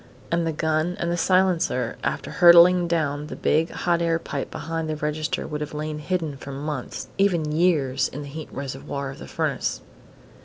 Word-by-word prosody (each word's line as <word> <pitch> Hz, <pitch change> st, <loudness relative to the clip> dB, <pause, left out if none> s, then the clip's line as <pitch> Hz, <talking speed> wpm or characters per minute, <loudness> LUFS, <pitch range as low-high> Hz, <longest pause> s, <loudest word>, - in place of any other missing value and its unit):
And 170 Hz, 0 st, +1 dB
the -, -, +1 dB
gun 155 Hz, +3 st, 0 dB
and 170 Hz, 0 st, -1 dB
silencer, 180 Hz, -11 st, +2 dB
after -, -, -2 dB
hurtling 175 Hz, 0 st, +7 dB
down 150 Hz, -3 st, -1 dB
the -, -, -6 dB
big 160 Hz, +2 st, +1 dB
hot 170 Hz, -1 st, 0 dB
air 165 Hz, -1 st, +2 dB
pipe 145 Hz, -4 st, -5 dB
behind 165 Hz, -1 st, -4 dB
the 155 Hz, -, -1 dB
register, 150 Hz, +1 st, -2 dB
could 150 Hz, 0 st, -4 dB
have 150 Hz, 0 st, -5 dB
lain 155 Hz, 0 st, -3 dB
hidden 160 Hz, -3 st, -2 dB
for 140 Hz, -, -8 dB
months, 140 Hz, -1 st, -5 dB
even 170 Hz, -6 st, +2 dB
years, 150 Hz, -6 st, +2 dB
in 145 Hz, +2 st, -7 dB
the -, -, -8 dB
heat 155 Hz, +2 st, -7 dB
reservoir 135 Hz, 0 st, -5 dB
of -, -, -11 dB
the -, -, -9 dB
furnace. -, -, -2 dB
155 Hz, 180 wpm, -24 LUFS, 145-170 Hz, -, hurtling